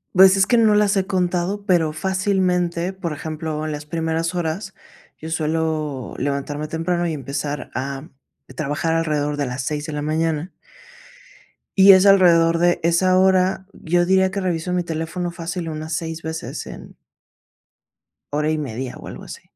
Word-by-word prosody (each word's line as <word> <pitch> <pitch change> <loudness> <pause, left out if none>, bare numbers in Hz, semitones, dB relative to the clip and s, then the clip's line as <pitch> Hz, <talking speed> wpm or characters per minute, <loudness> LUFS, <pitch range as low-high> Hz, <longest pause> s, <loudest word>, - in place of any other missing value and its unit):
Pues, 190 +1 +8
es 195 0 +4
que 240 - +3
no 220 -2 +5
las 210 -1 +3
he 190 0 0
contado, 185 +2 -1
pero 165 -4 +2
fácilmente, 185 -1 0
por 175 -4 -5
ejemplo, 155 0 -4
en 155 - -3
las 150 0 -6
primeras 165 +2 -2
horas, 175 +4 -3 0.4
yo 160 - -8
suelo 155 -4 -2
levantarme 145 +2 -3
temprano 170 +2 -1
y 160 - -2
empezar 145 +1 -4
a 135 +4 -4 0.4
trabajar 155 +2 -1
alrededor 150 -3 0
de 145 - 0
las 125 +1 -4
6 150 +1 -3
de 155 - -6
la 145 - -3
mañana 160 +2 -1 1.3
y 195 0 +9
es 190 +1 +5
alrededor 170 -4 +5
de 175 +1 +2
esa 185 +2 +3
hora, 190 0 +3
yo 175 +1 0
diría 190 0 +3
que 195 0 -3
reviso 180 -1 -2
mi 180 -1 0
teléfono 165 +2 -3
fácil 170 0 -5
unas 155 +1 -5
6 165 -1 -4
veces 160 +1 -5
en - - -11 1.4
hora 150 +1 +1
y 155 - 0
media 130 -3 -5
o - - -11
algo - - -9
así. - - -9
165 Hz, 165 wpm, -21 LUFS, 155-185 Hz, 1.4 s, y